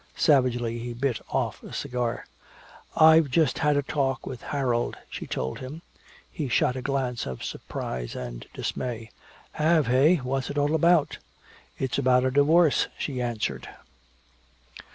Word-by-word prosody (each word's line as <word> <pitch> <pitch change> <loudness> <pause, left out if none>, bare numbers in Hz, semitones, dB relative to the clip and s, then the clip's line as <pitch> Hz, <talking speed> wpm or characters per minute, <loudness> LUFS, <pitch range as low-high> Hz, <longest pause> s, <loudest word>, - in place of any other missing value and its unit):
Savagely 120 -5 +2
he 120 +1 -5
bit 125 -1 -1
off - - -2
a - - -11
cigar. 125 -2 -3 0.7
"I've 160 -1 +6
just 150 -1 +2
had 150 -1 +2
a 145 - +1
talk 135 -2 -1
with 125 - -7
Harold," 125 -4 -1
she - - -6
told 65 +1 -3
him. 145 +6 -8 0.5
He 145 -5 -4
shot 120 +2 +2
a 130 - -4
glance 130 -3 -2
of 65 -1 -6
surprise 60 -1 -5
and - - -7
dismay. 115 -3 -4 0.4
"Have, 155 -3 +2
eh 135 +8 +5
what's 135 -2 -2
it 145 - -5
all 145 +1 +2
about?" 165 0 +3 0.6
"It's 130 0 -1
about 125 -1 +3
a 130 - +1
divorce," 150 +3 +4
she 130 -4 -3
answered. 110 - -3
130 Hz, 145 wpm, -26 LUFS, 120-145 Hz, 0.7 s, I've